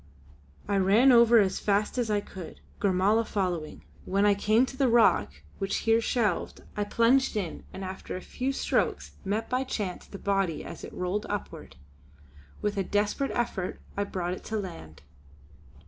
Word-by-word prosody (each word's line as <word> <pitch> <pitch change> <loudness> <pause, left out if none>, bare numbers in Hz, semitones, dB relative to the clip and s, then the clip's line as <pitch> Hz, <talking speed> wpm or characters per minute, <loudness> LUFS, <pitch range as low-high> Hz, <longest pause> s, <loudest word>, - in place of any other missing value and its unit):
I 200 -1 +1
ran 205 +8 +5
over 235 -1 +7
as 195 -3 +3
fast 210 +4 0
as 235 -2 0
I 205 -1 +1
could, 185 -4 -10 0.2
Gormala 200 +3 +3
following. 180 -8 -3 0.2
When 200 +2 +1
I 205 - +5
came 215 +5 +3
to 265 - -9
the 265 0 +2
rock, 150 - +3 0.2
which 195 0 -1
here 225 0 +4
shelved, 220 -6 -1
I 205 - -1
plunged 235 +4 +3
in 180 -6 -4
and 190 - -6
after 185 0 -6
a 185 - -5
few 260 +7 -3
strokes 270 - -1
met 210 +3 -1
by 255 +1 0
chance 205 -8 -4
the 200 - -9
body 195 -5 -1
as - - -9
it - - -7
rolled 180 +3 -2
upward. - - -5 0.9
With 210 -1 -1
a 195 - +1
desperate 205 +8 0
effort 220 -6 -2 0.2
I 200 - 0
brought 180 -3 -3
it - - -8
to 220 - -2
land. 165 - -8
205 Hz, 170 wpm, -28 LUFS, 190-230 Hz, 0.9 s, over